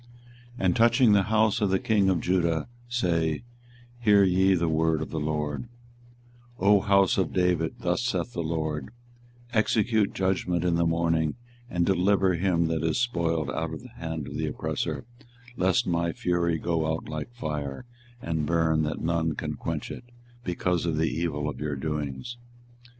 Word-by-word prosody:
24:021:011 95 - -3
And 90 - +3
touching 120 0 +5
the 100 -1 +5
house 110 -1 +2
of 105 - +2
the 95 - +3
king 100 -1 +2
of 90 -3 +1
Judah, 85 -3 +1 0.2
say, 85 -9 0 0.6
Hear 105 -4 +5
ye 95 +1 +4
the 85 -1 0
word 80 0 +2
of - - -9
the 80 - -2
LORD; 75 +6 -2 0.9
24:021:012 95 - 0
O 105 - +7
house 100 -1 +3
of 95 - 0
David, 90 -3 +1
thus 90 +5 0
saith 120 0 -2
the - - -2
LORD; 80 -3 -2 0.6
Execute 110 -1 +2
judgment 95 -2 0
in 90 - +2
the 85 0 +2
morning, 80 -1 +1 0.3
and 90 -1 +1
deliver 95 +1 +3
him 85 -1 +1
that 80 -1 -1
is 80 - +1
spoiled 85 - 0
out 80 0 -3
of 75 - -10
the - - -11
hand 80 -2 -5
of - - -6
the - - -1
oppressor, - - -3 0.5
lest 95 -4 +2
my 85 -1 0
fury 85 -2 0
go 80 -1 0
out 80 - -4
like 75 +7 -5
fire, 75 - -4 0.4
and 80 -2 -1
burn 80 -2 +2
that 75 -1 -2
none 80 -1 0
can - - -3
quench - - -4
it, - - -8 0.4
because 90 -2 -1
of 80 -2 0
the 80 +1 +1
evil 75 -3 -2
of 75 - -5
your 75 -1 -2
doings. 75 - -4
85 Hz, 170 wpm, -27 LUFS, 80-95 Hz, 0.9 s, O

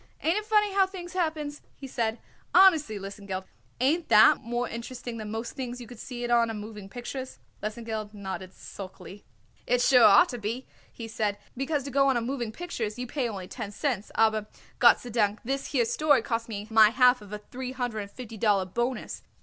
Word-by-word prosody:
"Ain't 330 +3 +2
it 425 0 -2
funny 420 -2 +3
how 385 -1 +4
things 360 -2 -8
happens?" 310 -5 -2
he 275 - -10
said. 230 -3 -1 0.4
"Honestly, 320 - +6
Lesengeld, 195 -1 -6 0.4
ain't 310 +7 +1
that 215 +2 +7
more 240 +1 -2
interesting 240 0 -6
than 215 -1 -6
most 225 +2 -4
things 250 -2 -5
you 245 - -8
could 235 0 -12
see 245 -1 -6
it 240 - -2
on 235 -1 +4
a 225 - -4
moving 210 -2 -8
pictures?" 255 +3 -6 0.2
Lesengeld 215 -1 -4
nodded 190 -2 -6
sulkily. 195 +1 -10 0.4
"It 245 0 +3
sure 250 0 +5
ought 355 - +7
to 245 - -5
be," 230 +5 -4 0.3
he 230 - -8
said, 215 -2 -1 0.2
"because 275 +2 -1
to 280 - -6
go 275 +1 +4
on 265 -2 +3
a - - 0
moving 240 -2 -3
pictures 230 -8 -4
you 250 - -3
pay 250 -1 -2
only 190 -4 -6
ten 215 -2 -6
cents, 220 -3 -2
aber 220 -1 +2 1.0
this 275 +3 -2
here 245 -5 +1
story 290 +4 +3
costs 230 -1 -2
me 205 -1 -5
my 220 -1 +7
half 250 +1 +4
of 205 -1 -13
a 210 - -3
three 250 +5 -7
hundred 245 -4 -3
and 200 -1 -5
fifty 225 -1 -9
dollar 200 -3 +2
bonus. 240 +7 -3
240 Hz, 195 wpm, -27 LUFS, 215-270 Hz, 1.0 s, that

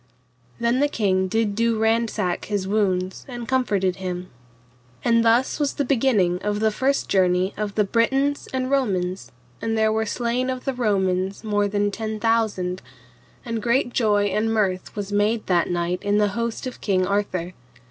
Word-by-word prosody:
Then 235 +2 +1
the 290 - +3
king 190 -8 +1
did 220 +1 0
do 230 +1 +1
ransack 220 -4 0
his 200 -3 -2
wounds 190 -3 0
and 240 -3 -7
comforted 200 -8 +1
him. 180 -1 -5 0.7
And 230 -1 +4
thus 235 +6 +2
was 290 -2 0
the 285 - 0
beginning 225 -9 +2
of 205 0 -1
the 220 0 +2
first 270 +5 0
journey 185 0 +2
of 210 -1 -4
the 210 - +3
Britons 270 +7 +1
and 260 0 -2
Romans, 190 -9 -1 0.3
and 225 0 -1
there 220 0 +3
were 220 0 0
slain 245 +3 -1
of 255 -1 -4
the 270 - 0
Romans 195 -4 0
more 205 -1 +1
than 205 0 0
ten 215 +1 -4
thousand, 210 -5 0 0.6
and 230 -2 -3
great 245 +1 +1
joy 210 -4 +2
and 215 +3 0
mirth 195 -4 -1
was 205 -1 -4
made 210 +2 +1
that 175 -2 +2
night 175 +1 -1
in 205 0 +1
the 210 -1 +3
host 235 +4 -3
of 255 - -7
King 185 -3 +1
Arthur. 185 -3 -1
210 Hz, 170 wpm, -23 LUFS, 190-235 Hz, 0.7 s, And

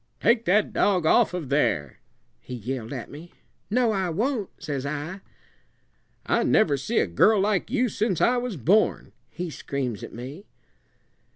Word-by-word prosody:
'Take 230 +2 +3
that 205 +3 +2
dog 185 -5 +2
off 230 +8 +4
of 175 -7 -5
there!' 110 - 0 0.4
he 125 - -8
yelled 120 0 -5
at 130 -5 -6
me. 160 +4 -11 0.4
'No, 240 +1 +2
I 190 -3 -1
won't,' 220 - -1
says 145 -5 -4
I. 150 +7 -5 1.0
'I - - +2
never 170 -10 +3
see 180 - -3
a - - +4
girl 150 - +4
like 200 0 +1
you 255 0 +1
since 210 -4 -1
I 250 - +3
was 245 -6 -3
born,' 190 - +2 0.2
he 175 -2 -5
screams 130 -8 -4
at - - -7
me. 135 - -9
180 Hz, 160 wpm, -25 LUFS, 140-215 Hz, 1.0 s, off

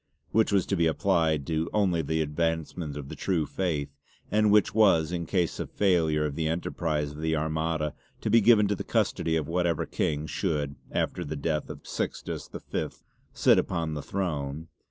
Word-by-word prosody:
Which 110 0 +3
was 100 -3 +3
to 100 - 0
be 85 -2 +3
applied 80 -4 +1
to 80 +1 -1
only 95 -6 +2
the 80 +1 0
advancement 80 0 -2
of 70 -2 -6
the - - -7
True 85 -5 0
Faith, 75 -7 -2 0.4
and 105 +1 +4
which 105 0 +4
was 95 -7 +4
in 85 -2 -3
case 90 -2 0
of - - -4
failure 80 -6 +2
of 75 - -2
the 80 +2 -1
enterprise 80 -2 -1
of 75 +1 -9
the 80 0 +1
Armada 80 0 -1 0.3
to - - -1
be 115 - +6
given 105 -2 +6
to - - +2
the - - -5
custody 80 -1 0
of 80 -3 -1
whatever 85 -1 0
King 75 0 -1
should, 75 -5 -2 0.2
after - - -1
the 75 - -4
death 75 +1 -2
of - - -9
Sixtus - - -4 0.2
V, - - 0 0.4
sit - - +4
upon 80 -2 -1
the 75 - -3
throne. 80 -3 -3
80 Hz, 185 wpm, -28 LUFS, 75-90 Hz, 0.4 s, be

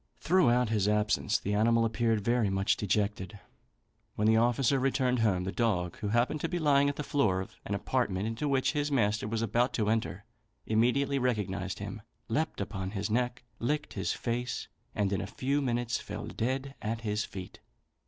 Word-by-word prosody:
Throughout 125 -10 +3
his 105 -3 +1
absence, 105 0 +2
the 100 - -3
animal 115 +2 +3
appeared 115 -1 +1
very 115 0 +2
much 95 +1 +2
dejected. 105 -2 -1 0.8
When 105 - 0
the 110 - +5
officer 120 +4 +3
returned 130 -1 +1
home, 100 -5 +2
the 95 - -2
dog, 95 -7 0
who 105 - -3
happened 120 +7 +1
to 165 - -1
be 175 - -1
lying 140 -3 +4
at 145 - -3
the 150 - -4
door 110 -11 +1
of 95 - -8
an - - -1
apartment 95 +2 -1
into 115 +6 -2
which 135 -1 +2
his 145 -1 -1
master 105 -5 +1
was 115 +1 -1
about 120 +3 +1
to 105 -2 +1
enter, 110 -3 -1 0.4
immediately 125 +5 +2
recognised 100 -7 -1
him, 105 +2 -6 0.3
leapt 155 +7 -1
upon 95 -2 -3
his 100 +1 -3
neck, 120 +1 0 0.2
licked 150 +5 -1
his - - -1
face, 120 +1 -3 0.3
and 100 -1 +1
in 95 - 0
a 95 - -4
few 140 +7 -1
minutes 120 -2 0
fell - - -6
dead 130 +3 -2
at 115 +1 -3
his 105 -1 -1
feet. 95 -3 -8
115 Hz, 185 wpm, -30 LUFS, 105-125 Hz, 0.8 s, the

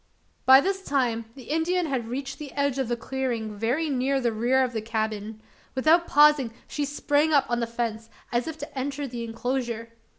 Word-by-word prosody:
By 265 +1 +9
this 385 +2 -1
time 245 -7 0
the 265 - -11
Indian 330 +5 0
had 260 -6 -2
reached 270 +3 -5
the 295 -3 -7
edge 280 -2 0
of 265 - 0
the 240 0 -1
clearing 235 -4 -3
very 245 +10 0
near 270 0 +1
the 240 -3 +1
rear 245 +4 +2
of 250 -1 -2
the 220 - -2
cabin. 220 -1 -3 0.4
Without 320 +6 +4
pausing 295 -4 +5 0.2
she 295 - -2
sprang 290 +2 +1
up 280 -2 +5
on 240 - +1
the 235 - -1
fence 230 -1 -3 0.2
as 240 +3 0
if 320 -1 -5
to 290 -2 -8
enter 280 +2 -3
the 240 -3 -5
enclosure. 230 0 -3
260 Hz, 195 wpm, -26 LUFS, 230-285 Hz, 0.4 s, By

